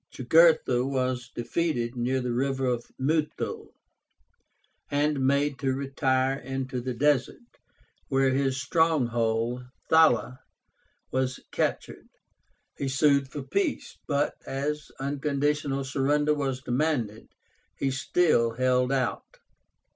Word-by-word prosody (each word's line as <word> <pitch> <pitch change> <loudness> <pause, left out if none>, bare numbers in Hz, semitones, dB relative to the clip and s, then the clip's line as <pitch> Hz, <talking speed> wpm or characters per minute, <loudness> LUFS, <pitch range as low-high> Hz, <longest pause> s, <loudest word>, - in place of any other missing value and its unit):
Jugurtha 130 -2 +4
was 130 -2 -2
defeated 120 -1 -2
near 125 +2 0
the 125 -1 -2
river 130 -1 0 0.2
Muthul, 150 +3 -1 1.2
and 145 -1 +1
made 140 0 +1
to 135 -2 0
retire 135 -1 0
into 130 -1 -4
the 125 0 -4
desert, 145 - 0 0.5
where 135 -1 +2
his 135 0 0
stronghold, 120 -6 +1 0.3
Thala, 130 -5 +4 0.7
was 130 0 -1
captured. - - -2 0.7
He 140 - -1
sued 140 0 +3
for 145 -3 -5
peace, 195 +10 -2
but, 145 0 +1
as 150 +2 -3
unconditional 140 0 -1
surrender 145 +3 +1
was 135 -3 -2
demanded, 120 -5 -1 0.5
he 135 - 0
still 130 -3 +2
held 125 +1 +2
out. 130 -3 -2
135 Hz, 100 wpm, -27 LUFS, 125-145 Hz, 1.2 s, Jugurtha